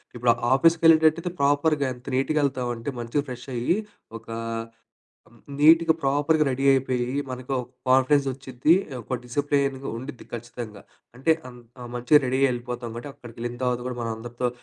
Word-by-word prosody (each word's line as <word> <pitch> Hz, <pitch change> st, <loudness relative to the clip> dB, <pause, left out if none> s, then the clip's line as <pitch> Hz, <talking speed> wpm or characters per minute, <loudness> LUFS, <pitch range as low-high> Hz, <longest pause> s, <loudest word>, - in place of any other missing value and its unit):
ఇప్పుడు 120 Hz, 0 st, +3 dB, 0.2 s
ఆఫీసుకి 165 Hz, +4 st, +4 dB
వెళ్ళేటట్టయితే 160 Hz, +2 st, +5 dB
ప్రాపర్‌గా 145 Hz, +1 st, +2 dB
ఎంత 125 Hz, 0 st, -16 dB
నీట్‌గా 145 Hz, +4 st, +1 dB
ఎళ్తాం 130 Hz, -3 st, -2 dB
అంటే 115 Hz, +4 st, -5 dB
మంచిగా 120 Hz, +5 st, -1 dB
ఫ్రెషయ్యి 125 Hz, +4 st, -2 dB, 0.4 s
ఒక -, -, -18 dB, 1.3 s
నీట్‍గా 160 Hz, +2 st, +6 dB
ప్రాపర్‌గా 145 Hz, +3 st, +2 dB
రెడీ 135 Hz, +1 st, -2 dB
అయిపోయి 130 Hz, -1 st, 0 dB, 0.2 s
మనకు 130 Hz, +1 st, -6 dB
ఒక 125 Hz, -, -9 dB, 0.2 s
కాన్ఫిడెన్స్ 135 Hz, +2 st, +4 dB
వచ్చిద్ది 130 Hz, +3 st, +1 dB, 0.3 s
ఒక 125 Hz, +3 st, -3 dB
డిసిప్లిన్‌గా 140 Hz, +1 st, -1 dB
ఉండిద్ది 130 Hz, +2 st, -8 dB
ఖచ్చితంగా. 115 Hz, -3 st, -8 dB, 0.3 s
అంటే 135 Hz, +6 st, +3 dB, 0.2 s
అన్ 125 Hz, -1 st, -12 dB, 0.2 s
ఆ! -, -, -7 dB
మంచిగా 125 Hz, +5 st, +5 dB
రెడీ 130 Hz, +1 st, 0 dB
అయ్యి 135 Hz, -1 st, +4 dB
ఎళ్ళిపోతాం. 120 Hz, 0 st, -5 dB
కాబట్టి 120 Hz, +5 st, -7 dB
అక్కడికెళ్ళిన 120 Hz, -1 st, -7 dB
తర్వాత 125 Hz, -1 st, 0 dB
గూడా 125 Hz, -1 st, -4 dB
మన 115 Hz, -, -2 dB
అందరితో 120 Hz, +2 st, -3 dB
130 Hz, 150 wpm, -25 LUFS, 120-145 Hz, 1.3 s, నీట్‍గా